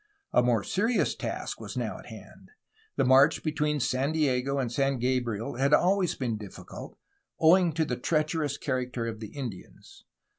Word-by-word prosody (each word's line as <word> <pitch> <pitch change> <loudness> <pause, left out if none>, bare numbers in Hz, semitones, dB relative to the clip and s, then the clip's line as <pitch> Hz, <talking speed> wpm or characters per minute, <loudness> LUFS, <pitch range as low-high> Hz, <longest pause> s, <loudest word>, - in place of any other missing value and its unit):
A - - +5
more 120 -4 +2
serious 225 +5 +1
task - - -5
was - - -7
now - - -3
at - - -13
hand. - - -13 0.5
The - - +2
march 135 +4 +5
between 150 -1 0
San 130 +3 0
Diego 140 -3 +1
and 125 -4 -1
San 135 +1 +1
Gabriel 120 -3 -1
had 140 +3 +4
always 185 +1 +2
been 120 -5 -2
difficult, 105 -3 -10 0.4
owing 170 +2 +5
to 160 +1 +1
the 125 -4 -3
treacherous 155 0 0
character 125 -3 -2
of 115 -1 -5
the 110 - -6
Indians. 120 -7 -9
135 Hz, 160 wpm, -28 LUFS, 125-155 Hz, 0.5 s, A